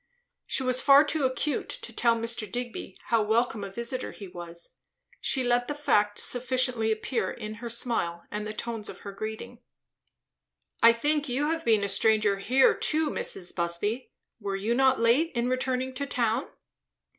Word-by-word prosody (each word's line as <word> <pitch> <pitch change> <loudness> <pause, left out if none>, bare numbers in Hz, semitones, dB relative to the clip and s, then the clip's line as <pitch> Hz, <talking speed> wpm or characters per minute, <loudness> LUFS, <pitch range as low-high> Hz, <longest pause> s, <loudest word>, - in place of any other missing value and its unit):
She 265 - -1
was 255 0 +2
far 280 +1 +7
too 300 -2 0
acute 260 +3 -1
to - - -7
tell 235 -1 +3
Mr. 230 -3 -2
Digby 240 -5 -5
how 230 -1 +4
welcome 220 0 +1
a 200 - -5
visiter 235 +5 -4
he 200 - -9
was. 175 -1 -9 0.5
She 265 - +1
let 245 0 +2
the 295 - -3
fact 210 -8 +2
sufficiently 250 -2 0
appear 220 -2 -1
in 215 0 -6
her 235 - -4
smile 225 -8 -1
and 210 0 -3
the - - -4
tones 225 0 -5
of - - -10
her 200 - -7
greeting. 215 +2 -6 1.2
"I 230 - +9
think, 295 +5 0
you 285 +5 0
have 325 0 -2
been 220 -3 +3
a - - +1
stranger 210 0 +2
here 255 +6 +4
too, 310 -1 0
Mrs. 180 - -2
Busby. 175 +8 -2 0.3
Were 200 -2 -3
you 205 +4 0
not 265 +1 +3
late 245 +9 +3
in 240 0 +1
returning 255 0 -1
to 280 +2 -4
town?" 235 0 0
235 Hz, 170 wpm, -28 LUFS, 210-260 Hz, 1.2 s, I